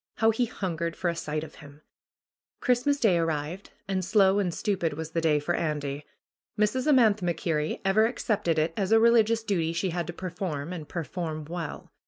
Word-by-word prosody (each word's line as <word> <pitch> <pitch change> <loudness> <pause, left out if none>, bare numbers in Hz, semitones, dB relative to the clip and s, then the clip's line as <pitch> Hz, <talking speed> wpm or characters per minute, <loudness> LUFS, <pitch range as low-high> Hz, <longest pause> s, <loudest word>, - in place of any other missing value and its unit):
How 225 0 +4
he 240 +3 +1
hungered 170 -5 -3
for 175 -2 0
a - - -6
sight 155 -2 -3
of 155 - -10
him! 145 0 -14 0.8
Christmas 255 +3 +2
Day 190 -9 +3
arrived, 165 +3 -2 0.2
and 190 -1 -1
slow 195 +1 +4
and 185 -3 0
stupid 175 -3 -1
was 160 +1 -6
the 165 - 0
day 155 -2 +3
for 160 +4 -1
Andy. 145 -3 -2 0.5
Mrs. 235 +6 +1
Amantha 225 -8 +4
MacKerrie 165 -3 -1
ever 215 +3 +4
accepted 210 -8 -1
it 155 +1 +1
as 200 -3 -1
a 225 - +7
religious 230 -1 +4
duty 170 -7 0
she 185 +2 -1
had 170 -1 -2
to - - -3
perform, 175 -3 -4
and 155 -4 -7
perform 160 -2 -4
well. 165 -1 -6
175 Hz, 185 wpm, -27 LUFS, 160-210 Hz, 0.8 s, a